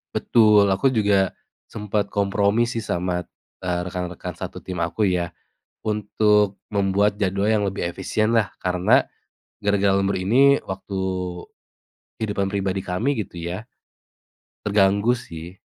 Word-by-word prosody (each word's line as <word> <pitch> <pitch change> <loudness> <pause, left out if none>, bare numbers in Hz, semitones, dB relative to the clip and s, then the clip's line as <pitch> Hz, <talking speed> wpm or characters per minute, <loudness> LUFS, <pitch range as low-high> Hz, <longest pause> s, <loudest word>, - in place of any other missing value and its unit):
Betul, 105 -3 +5
aku 100 +8 +2
juga 100 -4 +2 0.4
sempet 105 -1 -2
kompromi 100 +3 +2
sih 115 -2 -3
sama, 90 -2 -1 0.4
eee, 90 -1 0
rekan-rekan 90 -1 -5
satu - - -7
tim 95 - -7
aku 105 -2 0
ya, 90 -2 0 0.5
untuk 105 -1 +1
membuat 100 0 +1
jadwal 100 +1 +1
yang 105 -2 +2
lebih 95 -3 -2
efisien 110 +5 -1
lah, 115 -3 +1
karena 90 0 +3 0.6
gara-gara 100 -1 +3
lembur 100 0 +1
ini 135 +9 +4
waktu 95 0 -5 1.2
kehidupan 100 -3 -1
pribadi 95 -1 -1
kami 110 +11 -1
gitu 85 - -11
ya, 85 +5 -4 1.0
terganggu 100 +2 +3
sih. 85 -6 -8
100 Hz, 120 wpm, -23 LUFS, 95-105 Hz, 1.2 s, Betul